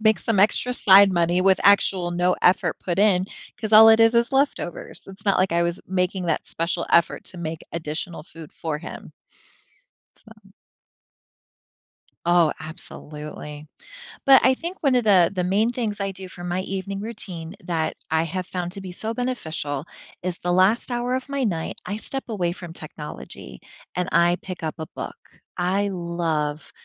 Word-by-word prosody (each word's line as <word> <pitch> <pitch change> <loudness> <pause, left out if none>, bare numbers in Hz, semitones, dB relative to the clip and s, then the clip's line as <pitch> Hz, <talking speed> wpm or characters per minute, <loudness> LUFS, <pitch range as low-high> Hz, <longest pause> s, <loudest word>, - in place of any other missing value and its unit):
make 220 -1 +4
some 220 -4 +1
extra 220 +4 +2
side 195 -2 +7
money 175 +1 +2
with 190 0 +4
actual 190 -3 +4
no 175 +1 +2
effort 180 - +3
put 180 0 -3
in 195 -3 +4 0.4
'cause 220 -1 -3
all 220 +1 +10
it 220 0 +5
is, 225 +1 +5
is 235 +2 +2
leftovers." 270 - -1
It's 195 +2 -12
not 200 - +4
like 185 -1 +2
I 170 0 +2
was 170 +1 -2
making 180 0 -1
that 165 - -1
special 170 +1 -2
effort 170 - +3
to 185 - -10
make 160 -1 -4
additional 160 +1 -4
food 160 -1 -12
for 155 -2 -3
him. 165 - -9 1.0
So - - -20 1.9
Oh, 170 -2 +4
absolutely, 150 -2 -9 0.6
but 270 -1 +7
I 260 - +6
think 340 +7 -7
one 275 -4 +3
of 245 - +2
the 185 -5 +5
the 180 -2 0
main 205 +6 +2
things 225 -4 -3
I 195 0 -1
do 190 -1 -9
for 175 -1 -10
my 180 +1 -1
evening 195 +1 -4
routine 195 -7 -7
that 165 -3 -1
I 160 +1 +2
have 180 +2 -4
found 180 -2 -4
to 195 - -8
be 185 -1 -7
so 220 +5 -4
beneficial 160 - -3 0.4
is 180 0 -2
the 175 - -1
last 190 +8 +3
hour 245 +1 -1
of 260 +1 -3
my 280 -1 -1
night, 170 -7 -2
I 210 - -3
step 270 +5 -4
away 180 -6 -1
from 175 -2 -9
technology, 150 -1 -9 0.3
and 180 0 -1
I 170 +1 +4
pick 185 -3 -7
up 155 - -2
a 160 - -5
book. - - -6 0.4
I 190 +3 +1
love 170 -5 -2
180 Hz, 175 wpm, -23 LUFS, 170-210 Hz, 1.9 s, all